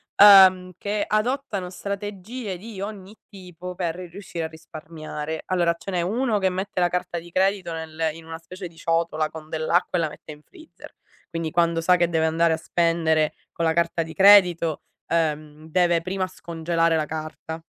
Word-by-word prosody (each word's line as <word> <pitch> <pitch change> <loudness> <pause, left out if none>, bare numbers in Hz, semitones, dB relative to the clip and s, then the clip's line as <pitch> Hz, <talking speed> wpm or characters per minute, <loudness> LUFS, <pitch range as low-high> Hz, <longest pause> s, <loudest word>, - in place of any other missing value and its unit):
ehm, 190 -3 +8
che 205 +1 -2
adottano 215 -4 -1
strategie 200 +2 -5
di 205 0 -9
ogni 200 0 -7
tipo 180 -2 -9
per 170 -2 -2
ri 180 -1 -8
riuscire 170 -2 -6
a - - -2
risparmiare. 155 -1 -7
Allora 175 -2 +1
ce 195 - -7
n'è 175 -1 0
uno 220 +3 0
che 190 -1 +2
mette 185 0 -3
la 175 - +3
carta 175 -1 -2
di 170 +1 -14
credito 190 -1 +1
nel 160 0 -3
in 165 0 -12
una 160 0 -7
specie 180 +2 -9
di 165 - -19
ciotola 165 -2 0
con 155 -1 -10
dell'acqua 170 +3 0
e - - +1
la 155 - 0
mette 150 - -12
in 150 - -16
freezer. 320 - -15 0.4
Quindi 165 -2 -3
quando 170 -1 +2
sa 180 +2 +4
che 175 -1 +2
deve 160 -1 +1
andare 165 +1 +2
a - - -1
spendere 165 -2 +1 0.2
con 170 - -3
la 160 - +3
carta 170 0 +1
di 160 - -9
credito, 180 -5 +5 0.3
ehm, 155 -1 -2
deve 175 0 +2
prima 185 +1 -2
scongelare 165 -2 -1
la 155 - 0
carta. 160 +1 -6
170 Hz, 180 wpm, -24 LUFS, 160-190 Hz, 0.4 s, ehm